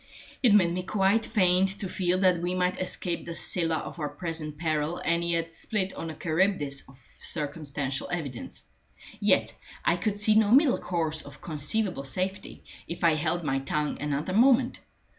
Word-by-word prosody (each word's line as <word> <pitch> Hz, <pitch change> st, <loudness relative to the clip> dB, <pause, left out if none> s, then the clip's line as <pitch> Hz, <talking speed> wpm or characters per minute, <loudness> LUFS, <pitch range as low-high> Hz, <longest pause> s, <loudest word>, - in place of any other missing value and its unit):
It 230 Hz, -6 st, +5 dB
made 175 Hz, -4 st, +4 dB
me 185 Hz, -, -1 dB
quite 195 Hz, +3 st, +1 dB
faint 190 Hz, 0 st, +2 dB
to 195 Hz, -, -3 dB
feel 180 Hz, 0 st, 0 dB
that 180 Hz, -3 st, +3 dB
we 180 Hz, +1 st, -1 dB
might 180 Hz, 0 st, 0 dB
escape 180 Hz, -1 st, -2 dB
the 170 Hz, -, -4 dB
Scylla 165 Hz, -2 st, +1 dB
of 155 Hz, +1 st, -6 dB
our 150 Hz, -2 st, -2 dB
present 155 Hz, -1 st, -2 dB
peril 155 Hz, 0 st, -1 dB
and 170 Hz, 0 st, 0 dB
yet 170 Hz, -1 st, 0 dB
split 195 Hz, +3 st, -2 dB
on 165 Hz, -, -6 dB
the 160 Hz, -, -6 dB
Charybdis 155 Hz, -5 st, 0 dB
of 135 Hz, 0 st, -17 dB, 0.2 s
circumstantial 140 Hz, -2 st, -3 dB
evidence. 145 Hz, -9 st, -5 dB, 0.6 s
Yet -, -, +3 dB, 0.3 s
I 175 Hz, -, +3 dB
could 205 Hz, +3 st, -2 dB
see 215 Hz, +1 st, +4 dB
no 215 Hz, -1 st, +4 dB
middle 265 Hz, +3 st, +5 dB
course 160 Hz, -3 st, -1 dB
of 145 Hz, 0 st, -12 dB
conceivable 160 Hz, +1 st, -1 dB
safety, 185 Hz, +8 st, -4 dB, 0.2 s
if 170 Hz, +1 st, -6 dB
I 165 Hz, -1 st, +5 dB
held 165 Hz, +3 st, -1 dB
my 135 Hz, -3 st, 0 dB
tongue 150 Hz, +2 st, -2 dB
another 150 Hz, +4 st, -2 dB
moment. 245 Hz, +3 st, +4 dB
170 Hz, 170 wpm, -27 LUFS, 150-190 Hz, 0.6 s, It